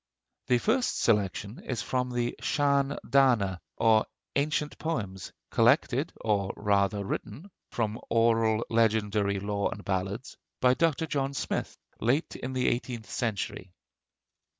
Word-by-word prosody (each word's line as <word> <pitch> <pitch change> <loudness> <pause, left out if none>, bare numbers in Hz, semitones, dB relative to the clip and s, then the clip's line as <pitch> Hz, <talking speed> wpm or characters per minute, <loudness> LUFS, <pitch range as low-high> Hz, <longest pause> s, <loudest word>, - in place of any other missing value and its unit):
The 125 - +4
first 240 - +1
selection 105 0 0
is 125 -4 -3
from 125 -1 -1
the 120 -1 -1
'Sean 140 -1 +1
Dana,' 115 - +3 0.2
or 110 -1 +4 0.3
Ancient 150 +1 0
Poems, 100 - -3 0.2
collected, - - +3
or 100 -3 +1
rather 100 0 +1
written 135 - -5 0.2
(from 110 -1 -2
oral 115 -1 +3
legendary 105 -3 +2
lore 100 0 -1
and 100 - -8
ballads), 95 +5 -3 0.2
by 125 0 +5
Dr. 160 +2 +1
John 140 -2 -2
Smith, - - -3 0.2
late 135 +8 0
in 130 +1 -5
the 130 -1 +1
eighteenth 120 -2 -2
century. 100 -5 -3
115 Hz, 125 wpm, -28 LUFS, 105-130 Hz, 0.3 s, by